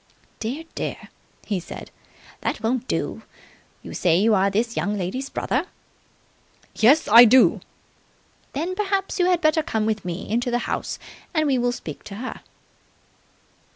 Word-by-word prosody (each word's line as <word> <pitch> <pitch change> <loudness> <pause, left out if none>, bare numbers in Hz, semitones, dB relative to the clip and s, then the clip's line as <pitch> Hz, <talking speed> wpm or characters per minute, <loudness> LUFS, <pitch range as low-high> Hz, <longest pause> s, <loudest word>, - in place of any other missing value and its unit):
"Dear, 255 +8 -4
dear!" - - -5 0.4
he 200 -4 -1
said. 175 - -9 0.5
"That - - -3
won't 250 +2 0
do! - - -2 0.6
You - - -8
say 170 -2 +2
you 215 +4 +3
are 195 0 +3
this 230 +4 -1
young 205 +1 -1
lady's 230 +9 -3
brother?" 285 +8 -1 1.1
"Yes, 270 +8 +4
I 230 +3 +10
do!" 245 +2 +6 0.9
"Then 330 +6 -2
perhaps 390 0 -1
you 355 - +4
had 355 -2 +2
better 310 -1 +3
come 220 -7 -1
with 215 -2 -1
me 175 0 -5
into 240 +3 0
the 240 - +1
house - - -3 0.4
and 310 -1 +3
we 270 -3 +2
will 245 0 +1
speak 160 -11 -8
to 200 - -8
her." 255 +5 -6
240 Hz, 155 wpm, -23 LUFS, 210-300 Hz, 1.1 s, I